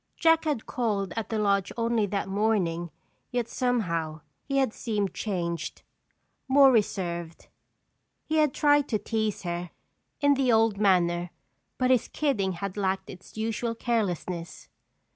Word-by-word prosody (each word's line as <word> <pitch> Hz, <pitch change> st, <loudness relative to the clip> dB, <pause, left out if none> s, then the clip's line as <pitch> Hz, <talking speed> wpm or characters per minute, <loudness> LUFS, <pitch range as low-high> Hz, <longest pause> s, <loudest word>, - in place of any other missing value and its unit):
Jack 325 Hz, -1 st, +4 dB
had 295 Hz, -8 st, -1 dB
called 205 Hz, -6 st, -1 dB
at 225 Hz, -1 st, -3 dB
the 225 Hz, -, -1 dB
lodge 200 Hz, -2 st, +1 dB
only 230 Hz, -2 st, +1 dB
that 200 Hz, -1 st, -2 dB
morning 190 Hz, -5 st, 0 dB, 0.4 s
yet 245 Hz, -2 st, -1 dB
somehow 170 Hz, -13 st, -1 dB, 0.2 s
he 275 Hz, -1 st, -2 dB
had 265 Hz, -5 st, +2 dB
seemed 205 Hz, -4 st, -2 dB
changed, 170 Hz, -5 st, -3 dB, 0.6 s
more 270 Hz, 0 st, +7 dB
reserved. 175 Hz, -7 st, -1 dB, 0.8 s
He 315 Hz, -, 0 dB
had 305 Hz, -3 st, +4 dB
tried 290 Hz, 0 st, +3 dB
to 220 Hz, -, +1 dB
tease 215 Hz, 0 st, -2 dB
her 175 Hz, 0 st, -3 dB, 0.5 s
in 285 Hz, 0 st, +4 dB
the 265 Hz, -2 st, +2 dB
old 220 Hz, -2 st, +3 dB
manner, 175 Hz, -3 st, +2 dB, 0.5 s
but 255 Hz, 0 st, +2 dB
his 250 Hz, -3 st, +3 dB
kidding 210 Hz, -11 st, 0 dB
had 195 Hz, +3 st, -5 dB
lacked 190 Hz, -1 st, -1 dB
its 185 Hz, +4 st, -14 dB
usual 225 Hz, +1 st, -2 dB
carelessness. 185 Hz, -7 st, -2 dB
210 Hz, 140 wpm, -27 LUFS, 185-245 Hz, 0.8 s, more